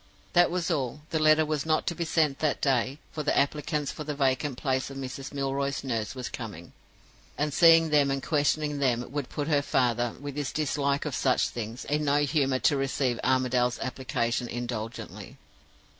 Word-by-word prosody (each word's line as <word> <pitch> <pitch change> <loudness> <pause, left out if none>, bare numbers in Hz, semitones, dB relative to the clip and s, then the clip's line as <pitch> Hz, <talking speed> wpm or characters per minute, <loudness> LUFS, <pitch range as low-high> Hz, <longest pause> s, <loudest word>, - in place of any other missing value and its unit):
That 175 -1 +5
was 175 0 -1
all. 140 -2 -2
The 160 - +1
letter 155 0 +5
was 150 -2 -1
not 155 -1 +1
to - - 0
be 170 0 -3
sent 155 -4 +1
that 155 -2 0
day, 135 0 +1
for 155 - -4
the - - 0
applicants 150 +1 0
for 150 - -7
the 150 -1 -4
vacant 135 -1 0
place 130 -2 -1
of 135 - -8
Mrs. 135 +1 -6
Milroy's 140 0 -2
nurse 120 -1 -2
were 130 - -6
coming, 105 -8 -7 0.6
and 150 0 -1
seeing 165 0 +6
them 145 -2 +4
and 135 -1 -2
questioning 150 -1 +1
them 125 -3 +1
would 145 -2 -3
put 145 -1 -3
her 145 -3 +3
father, 120 -4 +1
with 145 -1 -6
his 145 -3 -2
dislike 145 -1 0
of 150 - -3
such 130 0 +2
things, 115 +1 -6
in 150 +1 0
no 145 +1 +3
humor 140 -3 +1
to 145 - +2
receive 135 -2 0
Armadale's 125 -1 +2
application 120 -2 -2
indulgently. 120 -2 -6
140 Hz, 185 wpm, -28 LUFS, 130-150 Hz, 0.6 s, seeing